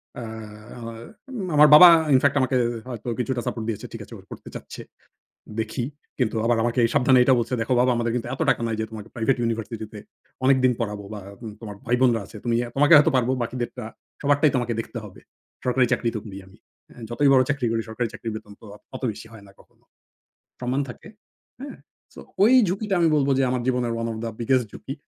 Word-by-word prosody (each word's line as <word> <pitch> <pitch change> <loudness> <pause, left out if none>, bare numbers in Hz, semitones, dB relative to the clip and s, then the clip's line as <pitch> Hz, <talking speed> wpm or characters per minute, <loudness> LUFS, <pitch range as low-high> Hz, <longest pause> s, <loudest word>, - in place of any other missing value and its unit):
অ্যা 125 - -6 0.5
আ - - -9 0.8
আমার 150 +1 +8
বাবা 180 +4 +11 0.3
in 130 - +6
fact 140 0 +3
আমাকে 130 0 +1 0.3
হয়তো 120 -1 -7
কিছুটা 125 0 -1
সাপোর্ট 115 -2 -3
দিয়েছে, 110 - -4
"ঠিক - - -7
আছে, - - -14
ও - - -14
পড়তে - - -10
চাচ্ছে, - - -8 0.8
দেখি।" 110 +3 -2 0.3
কিন্তু 120 -4 0
আবার 120 0 +2
আমাকে 120 +2 -1
এই 115 - +1
সাবধানে 130 0 +5
এইটা 130 +1 +5
বলছে, 120 +1 -3
"দেখো 115 +3 -1
বাবা 125 +1 +3
আমাদের 115 0 -1
কিন্তু 120 -1 -2
এতো 135 - -3
টাকা 125 - 0
নাই 115 - -1
যে - - 0
তোমাকে 110 -1 -9
প্রাইভেট 120 +2 +1
ইউনিভার্সিটি 115 -1 -3
তে 105 - -8 0.5
অনেকদিন 130 -1 +4
পড়াবো 105 -3 -3
বা 105 - -7 0.2
উ - - -6
তোমার 105 -3 -8
ভাইবোনরা 120 -1 +2
আছে। - - -13
তুমি 120 -1 0
এ্যা 120 - -3
তোমাকে 145 +3 +4
হয়তো 150 +2 +6
পারবো, 125 0 +1
বাকিদেরটা 120 0 -4 0.4
সবারটাই 145 +1 +3
তোমাকে 120 -1 -1
দেখতে 120 - -7
হবে। 100 -3 -12 0.4
সরকারি 125 0 +2
চাকরি 120 - +1
তো - - -2
করি 100 -3 -9
আমি। 95 +2 -18 0.3
এ্যা - - -15
যতই 130 +5 +2
বড় 130 -1 +6
চাকরি 140 -3 -1
করি, 115 0 0
সরকারি 115 +1 -2
চাকরির 115 - -6
বেতন 105 -1 -9
তো - - -16
আ - - -20 0.2
অত - - -12
বেশি 110 +2 -11
হয় 110 -2 -13
না - - -16
কখনো। - - -25 0.8
সম্মান 125 +2 -1
থাকে।" 120 - -11 0.5
হ্যাঁ। 275 +1 -8 0.4
সো - - -10 0.2
ঐ - - +8 0.2
ঝুঁকিটা 195 +2 -1
আমি 165 - +4
বলবো 140 -1 +1
যে - - +3
আমার 125 -1 -1
জীবনের 125 -2 0
ওয়ান 115 0 -2
অফ - - -6
দা 115 - -3
বিগেস্ট 125 0 +1
ঝুঁকি। 135 - -7
120 Hz, 215 wpm, -24 LUFS, 115-130 Hz, 0.8 s, বাবা